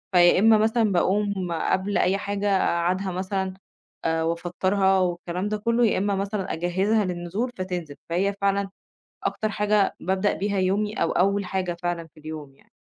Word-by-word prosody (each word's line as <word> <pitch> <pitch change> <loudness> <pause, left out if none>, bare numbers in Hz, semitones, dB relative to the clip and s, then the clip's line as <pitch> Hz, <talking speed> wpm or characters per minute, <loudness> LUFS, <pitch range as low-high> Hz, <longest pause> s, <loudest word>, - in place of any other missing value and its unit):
فيا 175 +1 +6
إما 220 +1 +6
مثلًا 220 0 +2
باقوم 190 0 0
قبل 190 +4 0
أي 190 +2 +2
حاجة 200 0 -2
اقعّدها 185 +2 0
مثلًا، 190 +1 -2 0.5
آآ 160 0 +1
وافطّرها 185 +3 +1
والكلام 180 +2 -2
ده 215 - -1
كلّه، 230 +3 +2
يا - - +1
إما 200 +1 0
مثلًا 195 0 -2
أجهّزها 190 +5 +1
للنزول 180 +7 -3
فتنزل، 175 -6 -4
فهي 195 +4 +1
فعلًا 200 0 +1 0.6
أكتر 215 - -1
حاجة 210 -1 +1
بابدأ 190 +2 +1
بيها 200 0 -1
يومي 205 +3 0
أو 165 - +1
أول 200 +2 +2
حاجة 180 -2 -2
فعلًا 175 -1 -2
في 155 - -16
اليوم 155 -3 -8
يعني. - - -27
190 Hz, 160 wpm, -25 LUFS, 175-205 Hz, 0.6 s, فيا